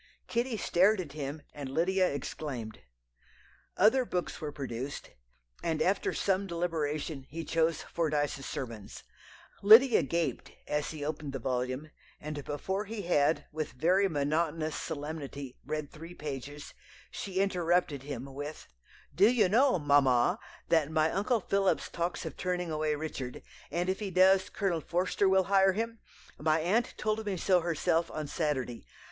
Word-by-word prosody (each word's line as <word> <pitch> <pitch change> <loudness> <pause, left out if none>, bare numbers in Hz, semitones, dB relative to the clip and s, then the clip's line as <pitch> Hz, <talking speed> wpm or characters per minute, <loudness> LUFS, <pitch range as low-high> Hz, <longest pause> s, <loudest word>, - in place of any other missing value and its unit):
Kitty 235 0 -1
stared 195 +3 +3
at 165 -6 -5
him, 145 0 -5
and 140 -2 -6
Lydia 185 +6 +2
exclaimed. 135 -5 -5 1.0
Other 240 +7 +5
books 180 -8 -3
were 150 -1 -3
produced, 135 -1 -5 0.5
and 160 -2 -1
after 190 +5 +1
some 195 0 0
deliberation 155 -5 -2
he 165 +2 -5
chose 165 -1 +1
Fordyce's 150 -4 -1
Sermons. 115 -6 -6 0.6
Lydia 225 +4 +8
gaped 170 +3 -2
as 150 0 -1
he 150 -2 -5
opened 150 -2 -4
the - - -2
volume, 130 +3 -2 0.3
and 150 -1 -5
before 190 +9 -3
he 215 -1 -5
had, 160 -3 +2
with 155 0 -4
very 185 +8 +3
monotonous 155 +1 0
solemnity, 145 -4 -5
read 150 -2 -4
three 165 +3 -10
pages 145 -1 -6 0.4
she 195 -2 -6
interrupted 175 -6 +1
him 135 -2 -6
with 145 +3 -7 0.5
"'Do 195 +8 +6
you 225 -6 +4
know, 250 +4 +4
mamma, 140 -5 +3 0.3
that 160 -3 +3
my 160 0 +2
Uncle 215 +4 +1
Phillips 195 0 +1
talks 170 +1 -3
of - - -5
turning 180 -2 -2
away 155 -1 0
Richard; 145 -4 -5 0.3
and 175 +1 -1
if 190 +1 0
he 210 -2 -3
does, 190 +1 +5
Colonel 185 -6 -1
Forster 185 +4 +1
will 190 0 +4
hire 195 0 +4
him? 230 +2 -3 0.4
My 155 +1 +2
aunt 205 +9 +1
told 215 0 -1
me 200 -3 -2
so 180 +2 +3
herself 165 0 0
on 155 - -4
Saturday. 140 - -2
160 Hz, 145 wpm, -30 LUFS, 145-190 Hz, 1.0 s, Lydia